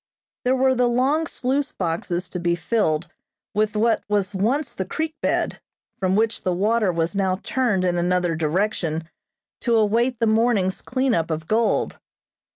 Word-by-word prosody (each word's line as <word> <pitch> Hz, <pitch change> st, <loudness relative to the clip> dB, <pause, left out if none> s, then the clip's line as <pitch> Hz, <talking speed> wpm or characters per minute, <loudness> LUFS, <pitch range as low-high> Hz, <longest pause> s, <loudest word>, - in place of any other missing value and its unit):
There 255 Hz, +1 st, +3 dB
were 265 Hz, 0 st, +3 dB
the 250 Hz, -1 st, +2 dB
long 270 Hz, +7 st, +1 dB
sluice 275 Hz, +3 st, -1 dB
boxes 175 Hz, 0 st, -2 dB
to 180 Hz, -, -5 dB
be 170 Hz, 0 st, +1 dB
filled 170 Hz, -4 st, 0 dB, 0.5 s
with 215 Hz, +1 st, 0 dB
what 225 Hz, +2 st, +2 dB
was 205 Hz, -1 st, 0 dB
once 240 Hz, +7 st, 0 dB
the 190 Hz, -, -3 dB
creek 315 Hz, -, -3 dB
bed, -, -, 0 dB, 0.4 s
from 185 Hz, 0 st, +1 dB
which 220 Hz, +1 st, +1 dB
the 180 Hz, -1 st, 0 dB
water 210 Hz, +1 st, +2 dB
was 165 Hz, +2 st, -1 dB
now 190 Hz, -2 st, +1 dB
turned 220 Hz, -8 st, +1 dB
in 175 Hz, -1 st, +1 dB
another 175 Hz, -1 st, +1 dB
direction 165 Hz, 0 st, -1 dB, 0.5 s
to 235 Hz, -2 st, +1 dB
await 230 Hz, +3 st, +2 dB
the 230 Hz, -, +2 dB
morning's 220 Hz, -4 st, +2 dB
cleanup 250 Hz, -11 st, 0 dB
of 160 Hz, 0 st, -3 dB
gold. 220 Hz, +6 st, +1 dB
210 Hz, 160 wpm, -23 LUFS, 180-240 Hz, 0.5 s, There